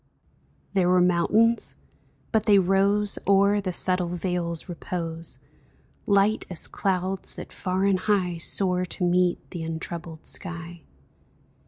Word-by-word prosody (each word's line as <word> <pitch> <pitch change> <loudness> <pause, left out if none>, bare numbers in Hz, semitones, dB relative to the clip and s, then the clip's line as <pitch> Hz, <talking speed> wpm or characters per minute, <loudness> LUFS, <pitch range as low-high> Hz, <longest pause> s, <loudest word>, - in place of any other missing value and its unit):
There 185 -3 +2
were 180 0 +4
mountains, 195 +6 +2 0.6
but 220 -1 +1
they 205 -1 +6
rose 195 +2 +2
O'er 200 +1 +4
the 185 -2 -2
subtile 180 0 +1
vale's 175 -1 -3
repose, 165 -1 -4 0.7
Light 200 +1 +3
as 180 - -3
clouds 190 0 -1
that - - -9
far 185 +1 -1
and 195 -2 +2
high 185 -4 0
Soar 180 +1 +2
to 180 +1 -4
meet 180 0 +1
the 175 - -5
untroubled 165 0 -6
sky. 170 -2 -3
180 Hz, 125 wpm, -25 LUFS, 175-195 Hz, 0.7 s, they